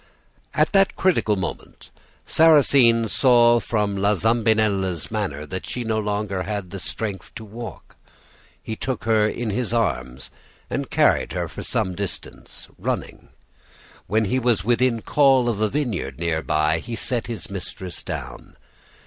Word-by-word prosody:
At -, -, +3 dB
that 195 Hz, -1 st, +3 dB
critical 170 Hz, -, +2 dB
moment 95 Hz, -2 st, -6 dB, 0.3 s
Sarrasine 140 Hz, -7 st, +5 dB
saw 120 Hz, 0 st, +5 dB
from 105 Hz, -3 st, -1 dB
La 100 Hz, +2 st, +2 dB
Zambinella's 105 Hz, -5 st, +1 dB
manner 95 Hz, -10 st, -3 dB
that 95 Hz, +4 st, -6 dB
she 125 Hz, -, -3 dB
no 110 Hz, -1 st, 0 dB
longer 105 Hz, -2 st, -2 dB
had 100 Hz, -1 st, -4 dB
strength 100 Hz, -2 st, -4 dB
to 110 Hz, -, -8 dB
walk; 110 Hz, -2 st, -9 dB, 0.7 s
he 110 Hz, -, -4 dB
took 125 Hz, -2 st, -4 dB
her 110 Hz, -1 st, +3 dB
in 115 Hz, -1 st, -3 dB
his 115 Hz, +2 st, -2 dB
arms 65 Hz, -, -2 dB, 0.4 s
and -, -, -2 dB
carried -, -, +2 dB
her -, -, -2 dB
for -, -, -8 dB
some 95 Hz, -, -1 dB
distance, 100 Hz, +1 st, -7 dB
running. -, -, -4 dB, 0.8 s
When 110 Hz, +3 st, +2 dB
he 130 Hz, +6 st, 0 dB
was 120 Hz, -3 st, +1 dB
within 120 Hz, 0 st, +1 dB
call 135 Hz, -4 st, +4 dB
of 110 Hz, -3 st, -1 dB
a 110 Hz, -, +2 dB
vineyard 115 Hz, -, -2 dB
near 85 Hz, -1 st, -1 dB
by, 75 Hz, +1 st, +1 dB
he 115 Hz, +7 st, -6 dB
set 120 Hz, +1 st, -2 dB
his 115 Hz, -5 st, -7 dB
mistress 95 Hz, -1 st, -6 dB
down. -, -, -7 dB
110 Hz, 145 wpm, -23 LUFS, 95-120 Hz, 0.8 s, Sarrasine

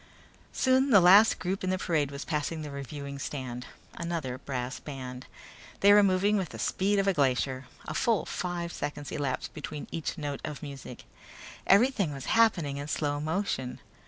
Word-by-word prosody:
Soon 260 Hz, +1 st, +3 dB
the 205 Hz, -6 st, +8 dB
last 195 Hz, +5 st, +7 dB
group 190 Hz, +2 st, -3 dB
in 185 Hz, -, 0 dB
the 185 Hz, -, +1 dB
parade 160 Hz, -6 st, 0 dB
was 140 Hz, 0 st, -6 dB
passing 155 Hz, +1 st, -2 dB
the 150 Hz, -, -6 dB
reviewing 140 Hz, 0 st, -6 dB
stand. 125 Hz, -3 st, -5 dB, 0.3 s
Another 160 Hz, -7 st, -4 dB
brass 130 Hz, -1 st, -4 dB
band. 130 Hz, -3 st, -7 dB, 0.5 s
They 200 Hz, +1 st, +7 dB
were 205 Hz, -, +8 dB
moving 200 Hz, +2 st, +3 dB
with 190 Hz, -4 st, -2 dB
the -, -, -9 dB
speed 200 Hz, +2 st, +1 dB
of 195 Hz, 0 st, +2 dB
a 195 Hz, -, +4 dB
glacier. 130 Hz, -2 st, 0 dB, 0.2 s
A -, -, -3 dB
full 230 Hz, -4 st, +1 dB
five 175 Hz, -1 st, -3 dB
seconds 145 Hz, 0 st, -5 dB
elapsed 140 Hz, -3 st, -3 dB
between 150 Hz, -1 st, -6 dB
each 165 Hz, +2 st, -3 dB
note 145 Hz, -3 st, -4 dB
of 150 Hz, +1 st, -6 dB
music. 135 Hz, -4 st, -8 dB, 0.6 s
Everything 200 Hz, -, +4 dB
was 135 Hz, -, -7 dB
happening 175 Hz, -11 st, +3 dB
in 145 Hz, +1 st, -5 dB
slow 145 Hz, -1 st, -1 dB
motion. 155 Hz, -6 st, -2 dB
150 Hz, 170 wpm, -29 LUFS, 140-190 Hz, 0.6 s, the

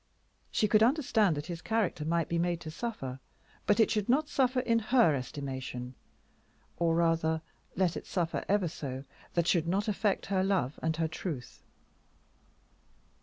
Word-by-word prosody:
She 215 Hz, -, +2 dB
could 215 Hz, +1 st, +4 dB
understand 225 Hz, -, +3 dB
that 145 Hz, -, -4 dB
his 170 Hz, -2 st, -6 dB
character 220 Hz, -9 st, 0 dB
might 165 Hz, 0 st, 0 dB
be 170 Hz, -, 0 dB
made 175 Hz, 0 st, 0 dB
to 155 Hz, -, -6 dB
suffer, 155 Hz, -, -5 dB, 0.5 s
but 205 Hz, -, +4 dB
it 225 Hz, -, +5 dB
should 210 Hz, -1 st, 0 dB
not 295 Hz, +5 st, +3 dB
suffer 255 Hz, -2 st, +2 dB
in 230 Hz, -2 st, +2 dB
her 225 Hz, -, +4 dB
estimation. 130 Hz, -2 st, -5 dB, 0.8 s
Or 165 Hz, -1 st, +2 dB
rather, 165 Hz, -1 st, +2 dB, 0.3 s
let 180 Hz, -2 st, +1 dB
it -, -, -6 dB
suffer 170 Hz, -3 st, -1 dB
ever 200 Hz, -2 st, +3 dB
so, 135 Hz, -4 st, -5 dB, 0.3 s
that 170 Hz, -1 st, +2 dB
should 170 Hz, -2 st, +2 dB
not 195 Hz, +5 st, 0 dB
affect 205 Hz, -1 st, 0 dB
her 190 Hz, -1 st, +1 dB
love 190 Hz, -8 st, 0 dB
and 160 Hz, 0 st, 0 dB
her 165 Hz, -1 st, +1 dB
truth. 155 Hz, -5 st, -6 dB
170 Hz, 160 wpm, -31 LUFS, 155-210 Hz, 0.8 s, it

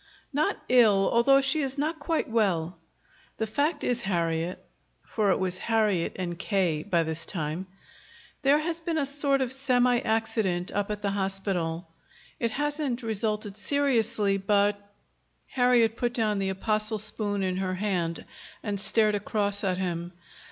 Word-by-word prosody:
"Not 300 Hz, +3 st, +1 dB
ill, 215 Hz, -6 st, +5 dB
although 275 Hz, +4 st, +5 dB
she 285 Hz, +3 st, +1 dB
is 270 Hz, 0 st, -3 dB
not 315 Hz, +3 st, -1 dB
quite 320 Hz, +2 st, -1 dB
well. 180 Hz, -7 st, 0 dB, 0.6 s
The 220 Hz, -, 0 dB
fact 290 Hz, +7 st, -1 dB
is, 245 Hz, -1 st, 0 dB
Harriet," 170 Hz, -3 st, -1 dB, 0.5 s
for 215 Hz, -3 st, 0 dB
it 190 Hz, -, +3 dB
was 185 Hz, -1 st, -2 dB
"Harriet" 215 Hz, -6 st, +1 dB
and 175 Hz, -2 st, -4 dB
"K." 185 Hz, -7 st, 0 dB
by 170 Hz, -2 st, +1 dB
this 160 Hz, +1 st, -4 dB
time, 165 Hz, +1 st, -3 dB, 0.7 s
"there 280 Hz, +2 st, +5 dB
has 330 Hz, +2 st, -2 dB
been 330 Hz, 0 st, -2 dB
a 290 Hz, -, +1 dB
sort 280 Hz, -1 st, 0 dB
of 260 Hz, -1 st, -1 dB
semi 250 Hz, -2 st, +2 dB
accident 220 Hz, -6 st, -1 dB
up 205 Hz, 0 st, -1 dB
at 210 Hz, 0 st, -4 dB
the 200 Hz, -, +1 dB
hospital. 190 Hz, -4 st, -2 dB, 0.5 s
It 235 Hz, -, +1 dB
hasn't 290 Hz, -1 st, -2 dB
resulted 215 Hz, -2 st, -2 dB
seriously, 230 Hz, -6 st, +1 dB
but 205 Hz, +1 st, +2 dB, 0.4 s
" -, -, -44 dB
Harriet 245 Hz, -3 st, +4 dB
put 240 Hz, -1 st, -1 dB
down 215 Hz, -4 st, +1 dB
the 195 Hz, -1 st, 0 dB
apostle 215 Hz, +3 st, 0 dB
spoon 205 Hz, -1 st, -2 dB
in 185 Hz, -1 st, -1 dB
her 185 Hz, -1 st, -1 dB
hand 180 Hz, -4 st, -2 dB, 0.4 s
and 205 Hz, -2 st, -2 dB
stared 215 Hz, +2 st, +3 dB
across 205 Hz, 0 st, -1 dB
at 185 Hz, -2 st, 0 dB
him. 175 Hz, -1 st, -3 dB
210 Hz, 155 wpm, -27 LUFS, 190-245 Hz, 0.7 s, ill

